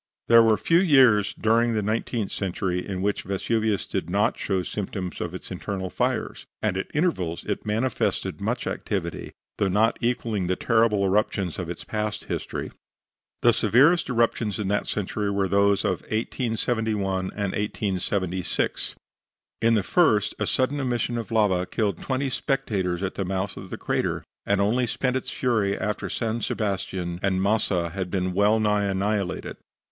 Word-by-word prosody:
There 115 0 +9
were 110 -1 +4
few 165 +1 +3
years 130 - +5
during 115 +1 +2
the 105 - 0
nineteenth 110 0 -1
century 90 -1 -2
in 95 -2 -4
which 105 0 0
Vesuvius 105 +2 0
did 80 - -3
not 100 +3 +2
show 95 -2 -1
symptoms 95 -2 -4
of 90 0 -4
its 95 - -8
internal 95 0 -4
fires, - - -2
and - - 0
at 95 - -3
intervals 95 - 0
it - - -4
manifested 115 +4 -1
much - - -1
activity, - - -3 0.3
though 100 - +3
not 105 +5 +2
equaling 115 -5 0
the 95 - +1
terrible 110 -2 +2
eruptions 95 -2 0
of 90 -2 -4
its 85 - -6
past 105 -1 -3
history. - - -4 0.7
The - - +6
severest 145 +9 +4
eruptions 115 -3 +1
in 105 -3 -2
that 105 - 0
century 105 0 -2
were 100 -1 +1
those 100 +1 +3
of 90 - 0
1871 110 -4 -1
and 100 -2 -2
1876. 95 -3 -1 0.7
In 115 +1 +4
the 105 - +2
first 110 - +3
a - - 0
sudden 130 +3 +1
emission 120 -2 -1
of 115 - -6
lava 100 -5 +2
killed 105 -6 -1
twenty 135 0 -1
spectators 100 - -1
at 95 - -2
the 100 - -2
mouth 95 +1 -2
of 95 - -9
the - - -5
crater, - - -1 0.2
and 100 0 +2
only 120 +5 +2
spent 130 +2 -1
its 130 - -2
fury 110 -6 0
after 105 0 -2
San 115 0 -2
Sebastian 95 -5 -2
and 95 -1 +1
Massa 95 -4 +1
had 95 0 -3
been 90 -1 -1
well 105 +3 +3
nigh 105 -1 +2
annihilated. 100 0 -1
105 Hz, 160 wpm, -25 LUFS, 95-115 Hz, 0.7 s, There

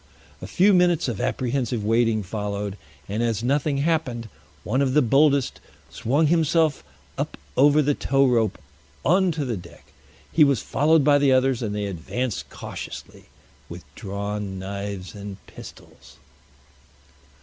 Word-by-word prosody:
A - - -6
few 195 +3 +4
minutes 180 -4 +3
of 115 -4 -3
apprehensive 125 -2 -1
waiting 115 -1 +2
followed, 100 0 -4 0.3
and 105 +3 -2
as 115 -2 -1
nothing 140 +2 +1
happened, 140 -7 -1 0.3
one 130 +6 0
of 135 -1 +1
the 150 - +6
boldest 140 +2 +3 0.3
swung 140 +7 +1
himself 160 -1 +2 0.4
up - - -3 0.2
over 145 +2 +5
the 145 +1 +2
tow 135 0 +2
rope 115 -5 +1 0.5
on 185 +4 +3
to 150 -2 -3
the 120 -3 -2
deck. 85 -1 -14 0.4
He 160 - +6
was 140 -5 +3
followed 155 +2 +3
by 145 0 +5
the 140 -1 +3
others, 130 -1 +2
and 105 -3 -3
they 105 0 -2
advanced 100 +5 -4
cautiously - - -9 0.4
with - - -9
drawn 100 0 -5
knives 100 0 -6
and 100 -1 -8
pistols. - - -14
125 Hz, 140 wpm, -24 LUFS, 105-145 Hz, 0.5 s, the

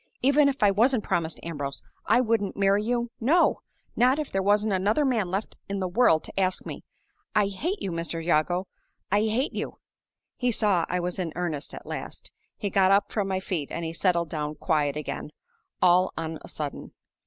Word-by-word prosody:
'Even 280 +2 +5
if 275 -5 -2
I 205 - +6
wasn't 230 +3 +3
promised 165 -2 -1
to - - -14
Ambrose, 145 -4 -4 0.2
I 245 - +5
wouldn't 225 -4 0
marry 200 +1 +3
you 240 +1 -1
no! 315 +9 +3 0.4
not 255 +3 +4
if 305 -2 -3
there 195 - 0
wasn't 205 +1 +2
another 205 +10 +2
man 225 -8 +1
left 195 +4 -3
in 200 - -2
the 185 - -1
world 175 -4 +3
to - - -5
ask 185 -1 0
me. - - -7 0.5
I 205 -2 +3
hate 335 - -3
you, 190 - -2
Mr. 165 0 -3
Jago! 175 +3 +2 0.5
I 205 - +4
hate 235 +6 0
you!' - - -4 0.6
He 250 -1 +1
saw 205 -6 +2
I 180 - 0
was 180 +1 -3
in 175 -3 -2
earnest 165 -5 -3
at - - -10
last. - - -7 0.3
He 200 -3 -3
got 190 0 +4
up 200 +1 +3
from 205 -3 -1
my 190 -1 0
feet, 175 -6 -3
and 170 - -4
he 160 - -4
settled 170 -1 +1
down 150 -2 -3
quiet 150 -3 0
again, 150 0 -4 0.5
all 180 +1 +5
on 160 -1 -4
a - - -11
sudden. 150 -2 -5
195 Hz, 200 wpm, -26 LUFS, 170-220 Hz, 0.6 s, I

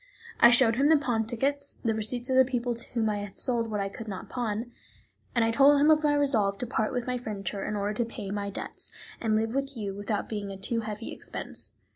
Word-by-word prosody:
I 235 - +9
showed 240 -1 +4
him 280 +3 +4
the 320 - +7
pawn 235 -6 -1
tickets, 280 +4 -1
the 225 -2 -1
receipts 230 +3 -2
of - - +2
the 260 - +8
people 245 -1 -1
to 235 0 -7
whom 230 -2 +1
I 210 -1 0
had 205 -1 -7
sold 235 -2 +3
what 210 -1 -2
I 195 - -1
could 220 +3 -8
not 190 -3 -6
pawn; 235 -1 -3 0.6
I 230 -1 +3
told 280 +4 +6
him 300 +2 +5
of 310 0 +4
my 295 -1 +3
resolve 220 -9 +2
to 245 - -3
part 220 -2 -1
with 245 -2 -2
my 250 -1 -2
furniture 200 -4 -4
in 210 - -3
order 205 +1 -1
to 235 +2 -1
pay 215 -4 -7
my 200 0 -2
debts, 200 - -7 0.3
and 220 -2 +1
live 225 +1 0
with 275 -1 -2
you 200 -3 -3
without 205 +1 -3
being 205 -2 -4
a 195 - -6
too 230 +4 0
heavy 215 0 -5
expense. - - -7
225 Hz, 240 wpm, -28 LUFS, 210-250 Hz, 0.6 s, I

